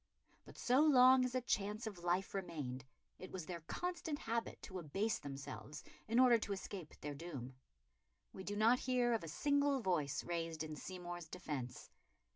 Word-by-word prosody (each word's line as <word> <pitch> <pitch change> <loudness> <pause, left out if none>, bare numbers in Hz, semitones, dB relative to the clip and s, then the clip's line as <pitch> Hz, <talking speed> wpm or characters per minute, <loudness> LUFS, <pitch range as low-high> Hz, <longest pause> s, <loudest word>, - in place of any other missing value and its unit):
But - - -13
so 250 +2 +3
long 260 -4 +7
as 250 0 -1
a 255 - +2
chance 210 -1 -1
of 195 -6 -6
life 180 +2 +1
remained, 145 -10 -4 0.3
it 185 - -8
was 185 -4 -5
their 175 0 -5
constant 345 - -3
habit 230 -3 -2
to 185 -2 -5
abase 195 +8 -1
themselves 140 +2 -7 0.2
in 230 +2 +3
order 245 -2 +7
to 205 - -2
escape 190 -4 -6
their 145 0 -3
doom. 140 -5 -6 0.8
We 190 - -7
do 205 +2 -3
not 225 +4 +5
hear 245 -2 +2
of 225 - 0
a - - -5
single 285 - +2
voice 170 - 0
raised 165 -2 -2
in 155 -1 -5
Seymour's 175 0 -6
defence. 150 -8 -5
190 Hz, 170 wpm, -38 LUFS, 160-240 Hz, 0.8 s, long